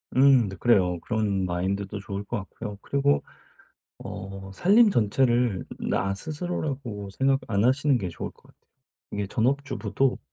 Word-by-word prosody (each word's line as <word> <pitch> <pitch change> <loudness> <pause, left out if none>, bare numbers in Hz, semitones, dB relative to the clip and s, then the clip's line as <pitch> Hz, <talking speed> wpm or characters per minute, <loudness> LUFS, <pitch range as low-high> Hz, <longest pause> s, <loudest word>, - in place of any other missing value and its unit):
음. 130 -3 +6
네 95 - -6
그래요. 90 -4 +3
그런 105 -4 0
마인드도 95 +3 -2
좋을 100 0 -5
것 120 +4 -3
같고요. 105 +1 -7
그리고 140 +1 +1 0.8
어 95 0 -7
살림 205 - +5
전체를 120 - +2
나 95 +1 0
스스로라고 140 - -4
생각 135 +6 +2
안 100 -1 +1
하시는 135 +1 +3
게 95 - -3
좋을 85 - -6
것 - - -26
같아요. - - -23 0.5
이게 100 -1 -2
전업주부도 130 0 0
110 Hz, 300 characters per minute, -26 LUFS, 100-135 Hz, 0.8 s, 음